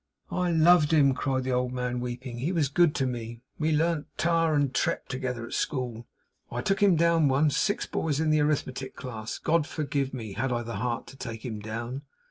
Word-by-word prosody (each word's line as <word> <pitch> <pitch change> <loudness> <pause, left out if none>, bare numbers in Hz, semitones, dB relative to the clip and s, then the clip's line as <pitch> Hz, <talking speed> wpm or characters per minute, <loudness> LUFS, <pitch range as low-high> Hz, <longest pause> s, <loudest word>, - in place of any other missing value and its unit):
'I 180 -1 0
loved 165 -1 +5
him,' 140 -4 +5
cried 130 -1 -1
the 130 - -2
old 125 0 0
man, 125 -1 -2
weeping. 120 0 -5
'He 150 +8 -1
was 160 -7 +1
good 160 +2 +3
to 135 - +1
me. 120 -1 -5 0.2
We 160 0 +1
learnt 160 0 +1
Tare 165 -1 +2
and 140 -2 +1
Tret - - 0
together 125 -2 -3
at - - -9
school. 120 -5 -2 0.4
I 120 - -2
took 195 0 +1
him 200 -3 +6
down 165 -1 +4
once, 140 +1 +3
six 205 +5 +1
boys 150 -3 -1
in 155 -1 +2
the 155 -1 +4
arithmetic 135 -3 -1
class. 115 -4 -6
God 160 -1 +1
forgive 140 -3 -2
me! 110 -6 -6
Had 125 +6 -1
I 120 -1 -1
the 115 0 -5
heart 120 -2 -2
to 135 - -13
take 115 -3 -7
him 110 -4 -4
down! 115 +5 -5
135 Hz, 210 wpm, -28 LUFS, 125-155 Hz, 0.4 s, him